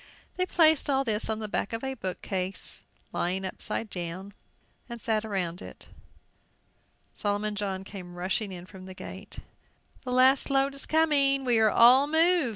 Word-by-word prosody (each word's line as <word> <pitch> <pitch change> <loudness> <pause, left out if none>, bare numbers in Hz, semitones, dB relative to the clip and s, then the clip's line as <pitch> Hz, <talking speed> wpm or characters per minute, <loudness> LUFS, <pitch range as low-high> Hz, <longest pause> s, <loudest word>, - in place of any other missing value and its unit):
They 365 0 -1
placed 315 -5 +4
all 270 -1 +2
this 220 -4 -1
on 220 - -1
the 215 -1 -5
back 205 - -3
of 225 - -3
a 265 0 -2
bookcase 190 -3 -4 0.3
lying 185 +2 -1
upset, 205 +3 -5
and 180 +3 -5 0.6
sat 220 -1 -1
around 185 -5 -3
it. - - -11 1.2
Solomon 205 +1 -2
John 195 -2 -3
came 185 -3 -10
rushing 190 +3 -2
in 180 -1 -8
from 185 0 -12
the 185 - -10
gate. 190 +2 -9 0.7
"The 250 - -5
last 260 +2 +4
load 275 0 +2
is 275 - -3
coming! 280 -4 +3
We 240 -3 +3
are 220 -1 +5
all 250 +6 +6
moved!" 325 -2 +3
215 Hz, 160 wpm, -27 LUFS, 190-270 Hz, 1.2 s, all